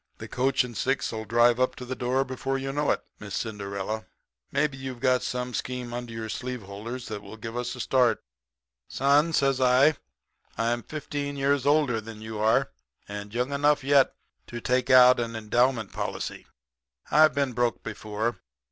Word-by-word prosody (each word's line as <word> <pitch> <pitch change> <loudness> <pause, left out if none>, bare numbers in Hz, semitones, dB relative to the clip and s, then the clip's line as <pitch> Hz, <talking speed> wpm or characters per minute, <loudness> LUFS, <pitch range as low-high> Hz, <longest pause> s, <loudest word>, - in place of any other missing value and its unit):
'The - - -8
coach 130 +1 +1
and 120 -2 -8
six'll 115 -3 -1
drive 120 +2 +4
up 130 - +1
to 125 - -8
the 130 +1 -4
door 130 +2 0
before 135 +1 -2
you 135 0 -4
know 145 0 0
it, - - +1 0.2
Miss 100 -3 -6
Cinderella. 105 +1 -4 0.4
Maybe 140 0 +1
you've 130 -2 -6
got 130 0 +3
some 125 0 -3
scheme 125 -1 -4
under 120 -1 -5
your 115 -1 -5
sleeve 125 +1 -5
holders 110 +6 -7
that 105 -2 -5
will 105 +2 -11
give 115 +1 -7
us 125 +1 -3
a - - -10
start.' 125 -3 +2 0.6
"'Son,' 145 +4 +3
says 135 -4 +2
I, 130 +4 +5 0.6
'I'm 120 +1 0
fifteen 145 0 -5
years 140 0 +1
older 145 -6 +3
than 110 0 -10
you 110 0 -6
are, 110 +1 +2 0.4
and 100 0 -7
young 125 +4 -1
enough 145 0 +2
yet 140 -1 +4 0.3
to 120 - -6
take 125 +2 0
out 125 -1 +8
an 115 -1 -3
endowment 115 +1 +1
policy. - - -4 0.6
I've 155 0 +6
been 140 -3 0
broke 120 0 0
before. 110 +1 -3
125 Hz, 175 wpm, -27 LUFS, 115-135 Hz, 0.6 s, out